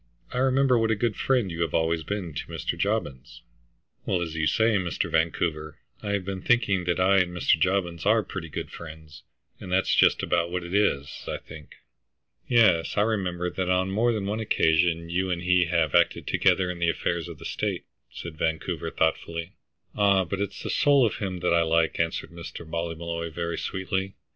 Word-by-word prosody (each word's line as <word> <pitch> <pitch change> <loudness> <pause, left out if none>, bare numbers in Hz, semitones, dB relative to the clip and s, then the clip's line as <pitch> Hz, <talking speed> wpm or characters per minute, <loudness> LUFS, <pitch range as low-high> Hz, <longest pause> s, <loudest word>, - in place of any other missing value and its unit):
I 125 - -1
remember 130 -1 +3
what 115 0 +1
a 110 - +2
good 110 0 -1
friend 125 -8 +1
you 85 0 -4
have 85 -3 -1
always 80 0 +1
been 90 -1 -4
to 75 - -5
Mr. 80 0 -3
Jobbins." 85 - -3 0.6
"Well, 90 - 0
as 85 -2 -3
you 80 -1 0
say, 110 +3 +3
Mr. 90 -4 -2
Vancouver, 80 -1 -1 0.2
I 100 -1 -2
have 100 -2 -1
been 95 -1 -4
thinking 100 -6 +2
that 90 +1 0
I 95 +1 +4
and 90 -1 +1
Mr. 80 - +3
Jobbins 90 -2 0
are 110 +2 +3
pretty 85 -5 -7
good - - -5
friends, 80 -2 -11 0.4
and 90 - -8
that's 95 +1 +2
just - - +4
about 85 0 +1
what 90 0 -3
it 85 +1 -7
is, 85 -9 0
I - - -2
think." 80 -2 -13 0.7
"Yes, 110 -10 +3
I - - +4
remember 90 -5 -1
that 95 -1 -2
on 90 +1 +1
more 115 +5 +2
than 105 -4 -2
one 105 +2 -2
occasion 85 -4 +1
you 95 +2 0
and 85 -1 -2
he 90 0 +3
have 85 -3 +1
acted - - +3
together 90 -1 +2
in 90 - -8
the 85 -1 +2
affairs 85 0 -1
of 85 -3 -9
the - - -11
state," - - -3 0.2
said 80 -3 -9
Vancouver, 80 0 -2
thoughtfully. 85 +2 -1 0.4
'"Ah, 100 -2 +3
but 95 +4 -3
it's 100 -1 -4
the - - -3
soul 140 -3 +4
of 105 - -1
him 95 -4 -4
that 90 - +2
I 85 - +4
like," 80 0 +1
answered 80 0 -1
Mr. 85 -1 -9
Ballymolloy 85 0 -4
very 85 +1 -3
sweetly. 95 0 -3
90 Hz, 195 wpm, -26 LUFS, 85-100 Hz, 0.7 s, I